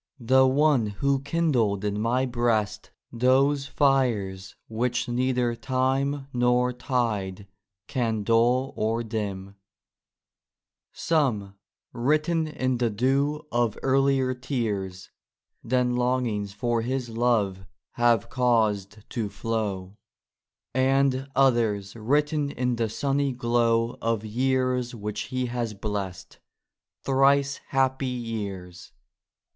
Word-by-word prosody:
— -, -, -39 dB, 0.2 s
The 130 Hz, 0 st, +7 dB
one 135 Hz, -3 st, +3 dB
who 135 Hz, +7 st, 0 dB
kindled 135 Hz, -10 st, 0 dB
in 105 Hz, 0 st, -1 dB
my 125 Hz, +4 st, +1 dB
breast 120 Hz, -4 st, -1 dB, 0.2 s
those 135 Hz, +4 st, +2 dB
fires 115 Hz, -11 st, 0 dB
Which 120 Hz, +2 st, -1 dB
neither 125 Hz, 0 st, 0 dB
time 135 Hz, +3 st, -1 dB
nor 125 Hz, 0 st, +2 dB
tide 110 Hz, -7 st, -2 dB, 0.4 s
can 115 Hz, -4 st, -1 dB
dull 120 Hz, +4 st, +2 dB
or 115 Hz, +2 st, -1 dB
dim: 100 Hz, -3 st, -5 dB, 1.3 s
Some, 120 Hz, -12 st, 0 dB, 0.4 s
written 155 Hz, +6 st, +1 dB
in 130 Hz, -4 st, -1 dB
the 120 Hz, -2 st, +2 dB
dew 135 Hz, +7 st, 0 dB
of 120 Hz, -3 st, 0 dB
earlier 135 Hz, -1 st, +2 dB
tears 105 Hz, -8 st, -4 dB, 0.5 s
Than 125 Hz, 0 st, +1 dB
longings 125 Hz, -5 st, 0 dB
for 115 Hz, +3 st, -1 dB
his 125 Hz, +1 st, -2 dB
love 110 Hz, -5 st, 0 dB, 0.3 s
have 120 Hz, -2 st, +2 dB
caused 110 Hz, -5 st, 0 dB
to 110 Hz, -4 st, -2 dB
flow, 105 Hz, -4 st, -3 dB, 0.8 s
And 135 Hz, +1 st, +2 dB
others 115 Hz, -7 st, +2 dB
written 145 Hz, +6 st, 0 dB
in 125 Hz, -2 st, -1 dB
the 115 Hz, -1 st, 0 dB
sunny 140 Hz, +4 st, 0 dB
glow 120 Hz, -1 st, +1 dB
Of 115 Hz, -1 st, -1 dB
years 125 Hz, +1 st, 0 dB
which 105 Hz, -1 st, -4 dB
he 130 Hz, 0 st, -1 dB
has 120 Hz, -3 st, -3 dB
bless'd,— 95 Hz, -3 st, -5 dB, 0.6 s
thrice 140 Hz, +1 st, +3 dB
happy 135 Hz, 0 st, +1 dB
years 100 Hz, -8 st, -6 dB
120 Hz, 105 wpm, -26 LUFS, 110-130 Hz, 1.3 s, The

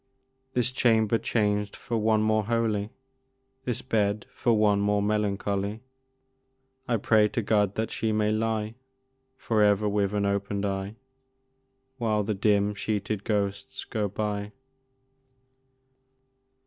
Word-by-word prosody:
This 125 Hz, 0 st, +1 dB
chamber 115 Hz, -3 st, +3 dB
changed 105 Hz, -2 st, 0 dB
for 120 Hz, -, -4 dB
one 110 Hz, -1 st, +2 dB
more 110 Hz, -1 st, +2 dB
holy, 110 Hz, -2 st, 0 dB, 0.8 s
This 125 Hz, -3 st, -2 dB
bed 105 Hz, -4 st, 0 dB
for 120 Hz, -, +1 dB
one 105 Hz, -1 st, +3 dB
more 105 Hz, 0 st, +2 dB
melancholy, 105 Hz, 0 st, -1 dB, 1.1 s
I 120 Hz, -2 st, +2 dB
pray 105 Hz, 0 st, +4 dB
to 120 Hz, -, -2 dB
God 105 Hz, -2 st, +2 dB
that 110 Hz, 0 st, -2 dB
she 110 Hz, 0 st, -1 dB
may 105 Hz, 0 st, +1 dB
lie 110 Hz, 0 st, -1 dB, 0.6 s
For 110 Hz, -4 st, 0 dB
ever 105 Hz, 0 st, +3 dB
with 100 Hz, -1 st, 0 dB
unopened 100 Hz, 0 st, -1 dB
eye, 100 Hz, +1 st, -3 dB, 1.0 s
While 110 Hz, -3 st, +1 dB
the 105 Hz, +1 st, -1 dB
dim 105 Hz, 0 st, +2 dB
sheeted 105 Hz, 0 st, -2 dB
ghosts 105 Hz, +6 st, -2 dB
go 105 Hz, -3 st, -2 dB
by! 105 Hz, +1 st, -3 dB
105 Hz, 120 wpm, -27 LUFS, 100-110 Hz, 1.1 s, pray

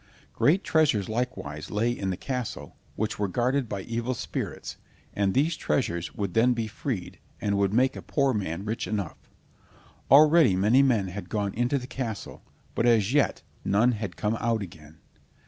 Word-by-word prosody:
Great 175 Hz, +7 st, +3 dB
treasures 140 Hz, -, +2 dB
likewise 110 Hz, -, -4 dB
lay 110 Hz, +3 st, +1 dB
in 100 Hz, -5 st, -3 dB
the 90 Hz, -, -2 dB
castle, 125 Hz, -4 st, -5 dB, 0.2 s
which 110 Hz, 0 st, -2 dB
were 100 Hz, -, +1 dB
guarded 125 Hz, +5 st, 0 dB
by 100 Hz, -1 st, -3 dB
evil 115 Hz, +4 st, -3 dB
spirits, -, -, -5 dB, 0.4 s
and 100 Hz, -2 st, 0 dB
these 155 Hz, +5 st, +2 dB
treasures 85 Hz, -, -1 dB
would 100 Hz, -4 st, -3 dB
then 120 Hz, +3 st, +4 dB
be 115 Hz, -2 st, -2 dB
freed, 100 Hz, -4 st, -5 dB, 0.2 s
and 100 Hz, -1 st, 0 dB
would 100 Hz, -1 st, +2 dB
make 130 Hz, +4 st, +2 dB
a -, -, -6 dB
poor 140 Hz, -2 st, +1 dB
man 95 Hz, -3 st, -3 dB
rich 110 Hz, +2 st, -3 dB
enough. 100 Hz, -6 st, -4 dB, 0.8 s
Already 150 Hz, -, +7 dB
many 105 Hz, +8 st, +4 dB
men 115 Hz, -8 st, +2 dB
had 95 Hz, 0 st, -7 dB
gone 100 Hz, -2 st, -1 dB
into 120 Hz, +4 st, +1 dB
the 125 Hz, -, -5 dB
castle, 120 Hz, -5 st, -5 dB, 0.3 s
but 120 Hz, -, +1 dB
as 115 Hz, -1 st, +3 dB
yet 145 Hz, -1 st, +2 dB, 0.2 s
none 110 Hz, +5 st, +3 dB
had 105 Hz, -5 st, -5 dB
come 105 Hz, +1 st, 0 dB
out 115 Hz, -2 st, 0 dB
again. 80 Hz, -4 st, -12 dB
110 Hz, 170 wpm, -27 LUFS, 100-125 Hz, 0.8 s, Already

